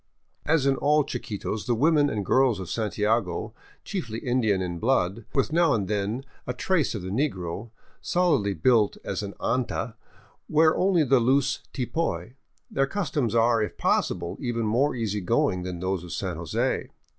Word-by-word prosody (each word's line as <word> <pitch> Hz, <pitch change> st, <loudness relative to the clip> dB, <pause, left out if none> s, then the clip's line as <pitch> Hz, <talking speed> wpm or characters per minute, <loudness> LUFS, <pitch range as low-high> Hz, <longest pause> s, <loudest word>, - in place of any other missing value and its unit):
As 155 Hz, -2 st, +3 dB
in 135 Hz, -1 st, +3 dB
all 150 Hz, +1 st, +3 dB
Chiquitos, 110 Hz, -5 st, -4 dB
the 120 Hz, -, +2 dB
women 145 Hz, +3 st, +3 dB
and 105 Hz, -6 st, -2 dB
girls 130 Hz, -1 st, +3 dB
of 95 Hz, -, -6 dB
Santiago, 105 Hz, -3 st, -1 dB, 0.3 s
chiefly 115 Hz, -, -4 dB
Indian 115 Hz, -6 st, +1 dB
in 90 Hz, -2 st, -3 dB
blood, 110 Hz, -3 st, +1 dB
with 135 Hz, +3 st, +1 dB
now 165 Hz, -4 st, +4 dB
and 100 Hz, -4 st, -1 dB
then 105 Hz, +5 st, -2 dB, 0.2 s
a 125 Hz, -, -2 dB
trace 165 Hz, -2 st, +1 dB
of 100 Hz, -, -5 dB
the 95 Hz, -, -5 dB
negro, 100 Hz, -, -2 dB, 0.3 s
solidly 145 Hz, -, +1 dB
built 105 Hz, +5 st, +3 dB
as 100 Hz, -, -3 dB
an 100 Hz, -1 st, -6 dB
anta, 120 Hz, -2 st, -1 dB, 0.6 s
wear 155 Hz, +1 st, +4 dB
only 185 Hz, -3 st, +3 dB
the 135 Hz, -2 st, +4 dB
loose 135 Hz, +3 st, +2 dB
tipoy. 125 Hz, -, -2 dB, 0.4 s
Their 135 Hz, 0 st, +1 dB
customs 140 Hz, -, -1 dB
are, 115 Hz, 0 st, +4 dB
if 105 Hz, -, -3 dB
possible, 85 Hz, -1 st, 0 dB
even 115 Hz, -3 st, -1 dB
more 125 Hz, +7 st, +2 dB
easy 105 Hz, -4 st, -2 dB
going 115 Hz, -1 st, +1 dB
than 90 Hz, -1 st, -5 dB
those 95 Hz, -1 st, -1 dB
of 90 Hz, -, -9 dB
San -, -, -3 dB
Jose. -, -, -1 dB
115 Hz, 165 wpm, -26 LUFS, 100-140 Hz, 0.6 s, now